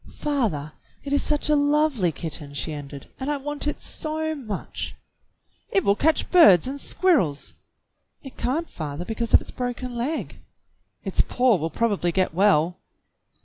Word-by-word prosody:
"Father, 210 - -2 0.3
it 280 - -3
is 285 - +3
such 295 -1 -1
a 300 - +4
lovely 290 - +2
kitten," 150 -3 -5
she 155 +2 -3
ended, 145 -1 -8
"and 265 +2 -3
I 295 - 0
want 295 +1 -4
it 295 - -2
so 315 0 -2
much!" 225 -10 -5 0.7
"It 390 - +2
will 200 - +3
catch 315 +7 +1
birds 205 - +7
and 275 +1 -5
squirrels." 235 - +1 0.7
"It 270 - -10
can't, 315 +7 -1
father, 150 +1 -6
because 230 +2 0
of - - +7
its - - -10
broken 250 0 -4
leg." 265 +7 -3 0.6
"Its - - +1
paw 250 -4 +2
will 160 0 -2
probably 200 -4 0
get 185 -1 0
well." 180 -2 +3
245 Hz, 155 wpm, -24 LUFS, -, 0.7 s, birds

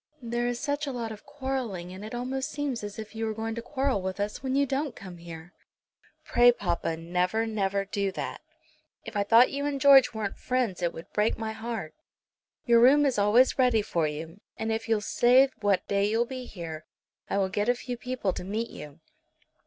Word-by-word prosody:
There 240 +1 -1
is 245 0 -2
such 290 +1 -2
a - - -2
lot 235 -3 -4
of 215 +4 -11
quarrelling, 260 -11 -4
and 190 +2 -9
it 220 +3 -6
almost 265 +3 -3
seems 280 -6 -3
as 205 0 -6
if 220 -1 -8
you 225 0 -4
were 220 - -3
going 225 +1 -3
to 235 - -5
quarrel 265 -3 -1
with 190 +1 -4
us 205 +1 -3
when 260 0 -1
you 280 0 +3
don't 275 +1 -2
come 185 -3 -10
here. 170 +1 -10 0.7
Pray, 245 0 +6
papa, 175 -7 -2
never, 180 +6 0
never 200 -3 -1
do 200 0 -1
that. - - -5 0.6
If 225 - -8
I 205 - +2
thought 230 +5 +5
you 280 +1 -3
and 280 -1 -2
George 270 -2 +7
weren't 215 -3 -4
friends 250 -8 -1
it 170 -1 +1
would 165 - -11
break 210 +1 +1
my 220 -1 -3
heart. 220 -7 -5 0.7
Your 235 -1 +5
room 285 +4 +6
is 260 -6 +1
always 225 +7 +4
ready 245 -4 +4
for 165 -5 0
you, 160 +6 -7 0.2
and 220 0 -2
if 225 +1 -3
you'll 220 -2 +2
say 250 +5 +5
what 205 -3 +1
day 200 0 +1
you'll 225 +2 +2
be 255 0 -6
here 165 -4 -7 0.5
I - - 0
will 195 -1 +1
get 205 +4 -1
a 245 - +4
few 245 +1 -5
people 240 -5 -2
to - - -6
meet 215 +5 -3
you." 150 +2 -10
225 Hz, 210 wpm, -28 LUFS, 195-255 Hz, 0.7 s, George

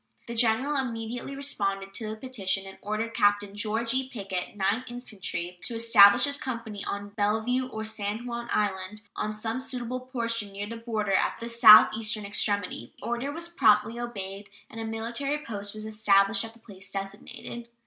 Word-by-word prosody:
The 235 - -6
General 240 +5 +2
immediately 240 +1 -3
responded 195 -8 -1
to 220 0 -4
this 215 0 -5
petition, 195 -7 -1
and 195 0 -11
ordered 215 +2 -3
Captain 205 -2 +2
George 225 +3 -1
E. 260 0 0
Pickett, 195 -7 -5
Ninth 200 +6 +1
Infantry, 190 -7 -5
"to 235 - -5
establish 225 -1 +7
his 285 0 +1
company 230 -5 -5
on 205 0 -4
Bellevue, 220 +5 0
or 220 -3 -5
San 215 +1 -3
Juan 235 -1 -5
Island, 205 +1 -1
on 215 0 -2
some 225 +3 -3
suitable 255 -2 -4
position 230 -5 -3
near 200 +1 -4
the 230 +2 -7
harbor 215 -3 -1
at 190 - +2
the 230 0 -5
southeastern 215 -1 +7
extremity." 200 - -1
This - - -17
order 240 +4 -2
was 335 +3 -4
promptly 225 -7 +3
obeyed 200 -4 -6 0.2
and 225 - -6
a - - -3
military 235 +6 -2
post 205 -7 -4
was 215 0 -5
established 205 -1 +3
at 225 0 -8
the 230 - -20
place 200 -3 -11
designated. 200 +4 -7
220 Hz, 170 wpm, -27 LUFS, 205-240 Hz, 0.2 s, establish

